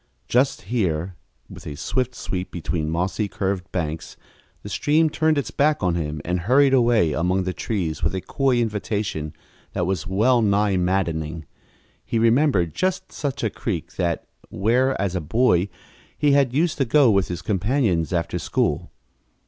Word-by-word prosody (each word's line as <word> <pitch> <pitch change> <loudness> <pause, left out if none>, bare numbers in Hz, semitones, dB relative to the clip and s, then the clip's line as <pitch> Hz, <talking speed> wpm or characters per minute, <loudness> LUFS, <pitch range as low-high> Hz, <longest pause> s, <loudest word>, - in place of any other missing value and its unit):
Just 130 +3 +1
here, 90 -5 -1 0.3
with - - -11
a 75 - -5
swift 125 - -2
sweep 95 0 -4
between 80 -2 -3
mossy, 90 +6 -1
curved 95 -2 -3
banks, 80 -3 -4 0.5
the - - -7
stream 155 +1 +2
turned 155 0 +2
its 140 - -2
back 150 +1 +2
to 90 - +2
him 75 -3 -3
and 90 +1 0
hurried 135 +9 +4
away 115 - +3
among 90 +4 +1
the 90 0 -2
trees 90 -9 -3
with - - 0
a 95 - -2
coy 135 +3 +1
invitation 105 -8 -2 0.4
that 90 - 0
was 90 -2 -2
well 115 +6 +3
nigh 100 -1 +2
maddening. 85 -4 -1 0.6
He - - -2
remembered 115 - +3
just 185 0 -1
such 140 -1 -4
a - - 0
creek 85 -7 -4
as - - -21
that 85 -3 -1 0.2
where, 125 +7 +1
as 95 -2 -1
a 90 - -1
boy, 100 +1 +2 0.5
he 145 -1 +3
had 140 -3 +4
used 155 +4 0
to 135 - +3
go 135 -1 +5
with 100 -2 +2
his 85 -1 -5
companions 100 - 0
after 85 -2 -1
school. - - -1
100 Hz, 165 wpm, -23 LUFS, 85-125 Hz, 0.6 s, go